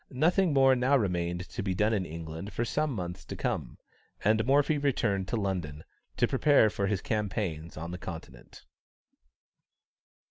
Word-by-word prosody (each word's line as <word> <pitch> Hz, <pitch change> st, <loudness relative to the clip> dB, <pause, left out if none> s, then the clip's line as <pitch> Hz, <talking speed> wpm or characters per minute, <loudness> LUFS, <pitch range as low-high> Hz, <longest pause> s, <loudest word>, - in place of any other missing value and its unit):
Nothing 170 Hz, +6 st, +2 dB
more 135 Hz, -2 st, +5 dB
now 130 Hz, +3 st, +3 dB
remained 90 Hz, -4 st, -1 dB
to -, -, -4 dB
be 95 Hz, -1 st, -1 dB
done 105 Hz, +4 st, +2 dB
in 95 Hz, -4 st, -1 dB
England 80 Hz, +4 st, -7 dB
for 120 Hz, -, -1 dB
some 150 Hz, +5 st, 0 dB
months 90 Hz, -6 st, -5 dB
to -, -, -6 dB
come; -, -, -3 dB, 0.5 s
and 110 Hz, +1 st, +4 dB
Morphy 145 Hz, +2 st, +3 dB
returned 110 Hz, -9 st, 0 dB
to -, -, -2 dB
London, 90 Hz, -7 st, -3 dB, 0.3 s
to -, -, +3 dB
prepare 140 Hz, -8 st, +4 dB
for 100 Hz, -1 st, -1 dB
his 100 Hz, -1 st, -1 dB
campaigns 100 Hz, -, -2 dB
on 85 Hz, +2 st, -5 dB
the 90 Hz, -, -6 dB
Continent. 80 Hz, -10 st, -10 dB
100 Hz, 155 wpm, -29 LUFS, 85-130 Hz, 0.5 s, more